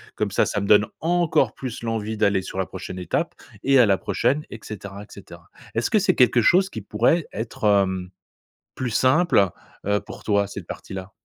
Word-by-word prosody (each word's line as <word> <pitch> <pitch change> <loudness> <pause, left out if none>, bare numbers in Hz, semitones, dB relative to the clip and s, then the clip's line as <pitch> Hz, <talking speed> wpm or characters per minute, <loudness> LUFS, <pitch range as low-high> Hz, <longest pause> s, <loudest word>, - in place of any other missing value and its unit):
comme - - -1
ça - - +2
ça 100 - -2
me 100 - -3
donne 105 0 +6
encore 165 -8 +1
plus 125 -4 -6
l'envie 110 -1 -3
d'aller 100 -3 +2
sur 95 - -6
la 95 - -1
prochaine 95 0 -7
étape 90 -2 -2 0.3
et 135 0 +5
à 120 - +6
la 100 -1 +3
prochaine 150 +9 0
et 115 - -7
cetera 100 -1 -8
et - - -10
cetera», - - -13 0.2
est-ce 115 +1 0
que - - +3
c'est - - +2
quelque 125 -1 +4
chose 190 - +4
qui 110 - -7
pourrait 120 - +1
être, 110 +1 -6
hem, 95 -3 +2 0.7
plus 130 -2 -2
simple, 130 - +3 0.4
heu, 105 0 +2
pour - - -11
toi, 100 -1 +1
cette 100 -3 -8
partie-là? 95 0 -7
105 Hz, 195 wpm, -23 LUFS, 100-130 Hz, 0.7 s, donne